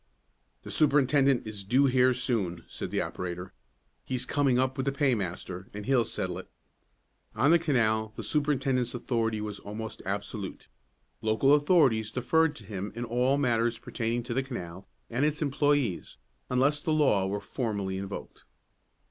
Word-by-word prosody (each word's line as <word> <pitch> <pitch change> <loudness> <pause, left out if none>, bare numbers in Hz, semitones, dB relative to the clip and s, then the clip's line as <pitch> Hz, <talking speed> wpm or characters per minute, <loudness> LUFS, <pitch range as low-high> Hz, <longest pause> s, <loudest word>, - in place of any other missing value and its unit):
"The - - -8
superintendent 140 -3 +3
is 105 -2 -6
due 130 +8 +3
here 130 -1 +4
soon," 100 -9 -1
said - - -6
the - - 0
operator. 90 0 -5 0.5
"He's 130 -1 -3
coming 140 -3 +2
up 130 +1 +1
with 135 +1 -3
the - - +3
paymaster, 100 - -1
and 105 -1 -6
he'll 125 -2 +3
settle 95 -5 -3
it." 95 - -10 0.9
On 135 +7 +4
the 170 - +6
canal 110 -8 +1
the - - -6
superintendent's 135 -5 0
authority 115 -3 -1
was 105 -1 -5
almost 110 +2 -7
absolute. 100 +1 -5 0.5
Local 110 +6 +3
authorities 145 -8 +4
deferred 160 +5 +2
to 115 - -11
him 100 0 -5
in 120 +1 -3
all 125 +4 +2
matters 120 -3 +1
pertaining 115 +1 -2
to 120 0 -4
the 135 - +1
canal 95 -9 -7 0.2
and 120 +4 0
its 150 0 +1
employes, 145 - 0 0.3
unless 140 +4 +2
the 155 - 0
law 135 -11 +3
were 100 +1 -2
formally 100 -6 -3
invoked. 100 0 -7
120 Hz, 155 wpm, -29 LUFS, 105-135 Hz, 0.9 s, the